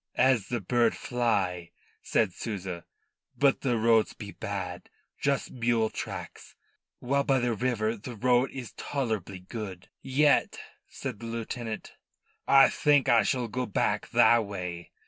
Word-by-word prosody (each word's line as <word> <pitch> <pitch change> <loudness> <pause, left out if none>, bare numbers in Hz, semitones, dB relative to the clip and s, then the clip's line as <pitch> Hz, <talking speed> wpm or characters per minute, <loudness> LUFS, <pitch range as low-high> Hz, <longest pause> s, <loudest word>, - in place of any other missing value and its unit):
"As 125 -6 +3
the 120 -2 -2
bird 120 +3 +2
fly," 95 -8 -1 0.3
said 105 -6 +1
Souza. 95 -6 -5 0.5
"But 140 -1 +3
the 125 -4 +1
roads 115 0 +3
be 100 -1 -9
bad 95 -4 -5 0.3
just 140 -1 0
mule 115 -2 +1
tracks, - - -7 0.4
while 140 +3 0
by 135 -1 +2
the 120 -2 0
river 115 -1 0
the 120 +3 -8
road 125 +3 +2
is 125 -4 -8
tolerable 110 -9 -3
good." 95 -1 -8
"Yet," 140 +2 +2 0.3
said 100 - -6
the 115 - -7
lieutenant, 115 -1 -5 0.5
"I 135 0 +8
think 145 -3 +3
I 115 - +6
shall 125 -2 0
go 125 +3 -3
back 100 - 0
tha' 120 0 +5
way." 90 -5 -6
115 Hz, 140 wpm, -28 LUFS, 100-125 Hz, 0.5 s, I